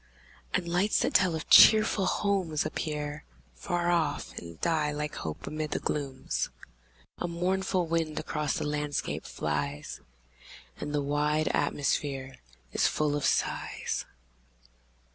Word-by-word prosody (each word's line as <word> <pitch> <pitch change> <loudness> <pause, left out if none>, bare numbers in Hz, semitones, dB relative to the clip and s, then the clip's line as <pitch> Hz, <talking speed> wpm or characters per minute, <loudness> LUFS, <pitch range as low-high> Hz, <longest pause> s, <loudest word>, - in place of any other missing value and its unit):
And 185 -2 0
lights, 180 +5 +2
that - - 0
tell 185 -4 +4
of 160 - -5
cheerful 215 -3 +7
homes, 185 -7 0
appear 150 -1 -3 0.3
Far 175 0 -1
off, 170 -2 0
and 85 -1 -11
die 155 -3 +1
like 150 0 -3
hope 80 -1 -5
amid 155 0 -3
the - - -1
glooms. 140 -3 -2 0.7
A 175 - -1
mournful 180 +1 0
wind 165 -2 -1
across 150 -3 -2
the - - -2
landscape 150 -1 -2
flies, 75 -1 -3 0.8
And 150 - -4
the 145 -1 0
wide 150 +2 +1
atmosphere 135 -2 -1 0.4
is - - +3
full 150 -1 0
of 145 - -1
sighs. - - -1
150 Hz, 125 wpm, -29 LUFS, 145-175 Hz, 0.8 s, cheerful